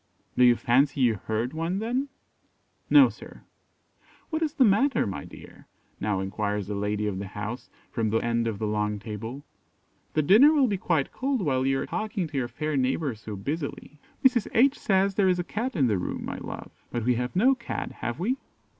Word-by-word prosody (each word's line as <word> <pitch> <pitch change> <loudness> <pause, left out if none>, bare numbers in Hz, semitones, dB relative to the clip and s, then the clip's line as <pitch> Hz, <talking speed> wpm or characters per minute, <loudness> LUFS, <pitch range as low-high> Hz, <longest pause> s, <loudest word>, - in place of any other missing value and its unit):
"Do 125 - +4
you 120 -1 +7
fancy 135 +4 +2
you 120 -3 +4
heard 115 +5 -1
one 165 +4 -2
then?" 245 +6 -1 0.8
"No, 280 -3 +8
sir." - - -11 0.9
"What 315 0 -1
is 310 -2 -1
the 265 - +5
matter, 225 +6 +3
my 95 -8 -5
dear?" - - -14 0.3
now 100 -2 -1
enquires 105 +1 -2
the 105 - -4
lady 105 +1 -1
of 100 -3 -2
the 100 - -5
house, 105 +5 -6 0.2
from 115 -3 0
the 110 - +2
end 115 0 0
of 110 -3 -2
the 110 - -2
long 105 0 -1
table; 115 +6 -7 0.7
"the 155 - +2
dinner 225 - +7
will 285 -4 +4
be 205 -5 0
quite 160 -6 0
cold 265 -4 -1
while 130 -4 +1
you 135 0 +2
are - - -3
talking 215 -4 -2
to 145 - -5
your 125 -2 0
fair 150 +5 -3
neighbour 135 +1 0
so 110 -1 -8
busily." 145 - -5 0.3
"Mrs. 245 -5 +4
H 270 +5 +4
says 195 -1 +2
there 195 -1 +3
is 180 - +2
a 175 - -1
Cat 235 +7 -3
in 140 -6 +3
the 105 -6 +1
room, - - -4
my - - -5
love; - - -8 0.2
but 120 -2 -2
we 125 - +4
have 125 +4 -3
no 250 +9 +5
Cat, 235 -3 -5
have 120 +5 -5
we?" 240 +9 0
135 Hz, 205 wpm, -26 LUFS, -, 0.9 s, No